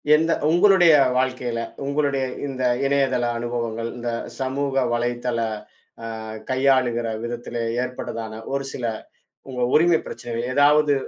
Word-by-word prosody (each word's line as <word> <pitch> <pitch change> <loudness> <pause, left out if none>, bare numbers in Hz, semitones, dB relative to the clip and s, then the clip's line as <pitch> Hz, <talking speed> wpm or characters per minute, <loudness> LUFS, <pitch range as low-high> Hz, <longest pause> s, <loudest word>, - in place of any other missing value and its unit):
எந்த 160 +2 +2 0.2
உங்களுடைய 175 -1 +6 0.2
வாழ்க்கையில 125 -2 -1 0.3
உங்களுடைய 140 -1 0 0.2
இந்த 130 -2 -4 0.2
இணையதள 135 -3 +2
அனுபவங்கள், 115 -1 -3
இந்தச் 120 -1 -4
சமூக 135 +1 -1 0.2
வலைத்தள 120 0 -1 1.1
கையாளுகிற 130 -3 +2 0.2
விதத்திலே 120 0 -4 0.2
ஏற்பட்டதான 115 -3 -5 0.2
ஒருசில 135 -3 -3 0.6
உங்க 125 -1 -4
உரிமை 170 +1 +5
பிரச்சனைகள், 120 -1 -5
ஏதாவது 145 +1 +5
130 Hz, 100 wpm, -23 LUFS, 120-140 Hz, 1.1 s, உங்களுடைய